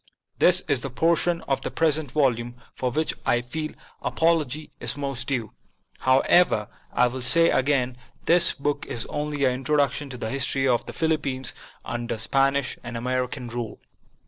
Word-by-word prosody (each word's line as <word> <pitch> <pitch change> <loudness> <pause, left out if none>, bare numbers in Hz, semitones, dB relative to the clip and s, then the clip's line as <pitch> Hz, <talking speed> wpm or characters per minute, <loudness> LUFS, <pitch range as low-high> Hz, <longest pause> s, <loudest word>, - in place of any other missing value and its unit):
This 180 +1 +6
is 140 -5 +1
the 135 - -4
portion 170 +5 +1
of 135 - -1
the - - -3
present 155 -3 0
volume 120 -4 0 0.2
for 130 - -2
which 155 +6 0
I 120 - +2
feel 155 +5 -5 0.3
apology 155 -3 0
is - - +2
most 140 -3 -3
due. 120 -6 -2 0.5
However, 130 - +3 0.2
I 125 - +3
will 125 +1 -3
say 165 +7 +5
again, 130 -2 +1 0.3
this 170 0 +5
book 145 0 -2
is 115 - -2
only 145 -1 -1
an 130 - +3
introduction 145 +2 0
to 125 - -7
the 110 -2 -4
history 135 0 0
of 120 -2 +1
the - - -6
Philippines 145 -5 -1 0.3
under 120 0 -3
Spanish 135 +4 +1
and 120 -1 -5
American 125 +1 -2
rule. 115 -2 -5
135 Hz, 160 wpm, -25 LUFS, 125-150 Hz, 0.5 s, This